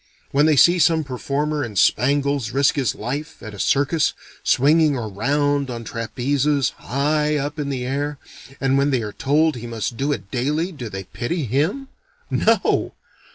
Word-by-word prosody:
When 145 +3 +4
they 155 - +4
see 175 +6 +5
some 160 0 +3
performer 145 +3 -2
in 110 -4 -6
spangles 140 +3 +2
risk 135 +3 +2
his 135 -8 -1
life, 145 +8 -5
at 110 - -8
a 100 - -10
circus, 145 - +2 0.3
swinging 150 +2 +3
around 140 +6 0
on 120 -1 -5
trapezes, 135 +5 0
high 150 +3 0
up 145 +2 -3
in 145 -1 -2
the 130 -3 -3
air, 145 +3 -2 0.4
and 135 0 +2
when 140 +1 +2
they 130 -5 0
are 105 -1 -5
told 150 +1 +1
he 120 0 -7
must 115 0 -4
do 140 +2 0
it 100 -8 -4
daily, 150 +8 -1
do 125 -9 -7
they 95 -1 -6
pity 145 - -3
him? 155 - -1 0.4
No! - - +1
140 Hz, 165 wpm, -21 LUFS, 125-150 Hz, 0.4 s, see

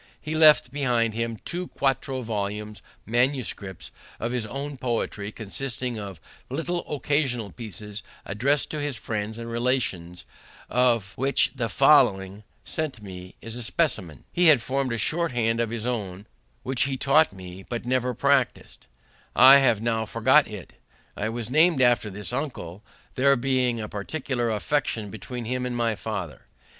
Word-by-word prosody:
He 155 - -5
left 155 -5 +6
behind 120 -5 +1
him 115 0 -2
two 180 +1 -4
quarto 135 -1 -1
volumes, 105 -1 -4 0.2
MS., 125 +3 +1 0.7
of 115 - -2
his 120 -3 -2
own 140 +4 -5
poetry, 115 -4 -2
consisting 120 +2 -4
of 100 -5 -7 0.3
little 170 +6 -2
occasional 135 -6 0
pieces 105 -2 -7 0.2
addressed 135 +9 0
to 155 - -3
his 145 -2 -2
friends 110 0 -4
and 115 0 -6
relations, 115 -8 -2 0.5
of 120 -5 +2
which 135 +1 +2
the 120 -4 -2
following, 105 -8 +4 0.2
sent 155 -3 -3
to 110 - -16
me, 90 -2 -9
is 115 0 -5
a 125 - -5
specimen. 100 - -1
He 175 0 +4
had 150 -5 +7
formed 135 0 -1
a 115 - -1
short 165 - 0
hand 115 -1 +1
of 115 -1 0
his 115 -1 -4
own, 105 -6 -3 0.4
which 130 0 +1
he 135 -1 -2
taught 145 +3 +4
me, 95 -1 -10
but, 120 +4 -6
never 125 0 0
practising 140 0 +1
it, - - -25 0.5
I 135 +3 +9
have 120 -5 +2
now 115 -1 0
forgot 130 +7 +4
it. 105 -5 -9 0.4
I 110 - -2
was 115 0 -5
named 160 +1 +4
after 120 -4 +3
this 105 +4 -6
uncle, 115 - -4 0.3
there 140 +2 +4
being 125 -2 +1
a 105 - -4
particular 120 +3 -3
affection 110 -2 -1
between 115 +3 -6
him 125 +2 -2
and 125 -1 -3
my 115 -1 +1
father. 100 - -6
120 Hz, 160 wpm, -25 LUFS, 105-135 Hz, 0.7 s, I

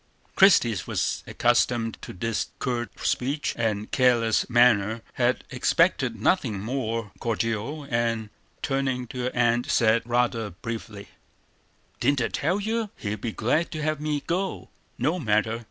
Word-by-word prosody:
Christie 180 - +6
was - - -1
accustomed 120 -1 +1
to - - -9
his 115 0 -1
curt 120 -3 -2 0.2
speech 140 +4 0
and 110 -3 -2
careless 120 -3 +3
manner; 115 -2 +4
had 125 0 +1
expected 130 - +2
nothing 115 - +1
more 115 -1 -3
cordial; 115 +5 -2
and, 115 -3 -1 0.3
turning 135 -2 -1
to 125 -2 -4
her 125 - -1
aunt, 120 0 +2
said, 115 0 +3
rather 120 -2 +1
bitterly: 105 +1 -7 0.9
"Didn't 145 -1 +2
I 115 - 0
tell 175 +7 0
you 220 +1 -1
he'd 105 -1 -4
be 115 - -2
glad 130 +11 0
to 155 -1 -4
have 155 -1 -1
me 150 -1 -1
go? 190 +3 -2 0.3
No 155 +9 0
matter! 110 -3 +1
120 Hz, 140 wpm, -26 LUFS, 115-140 Hz, 0.9 s, Christie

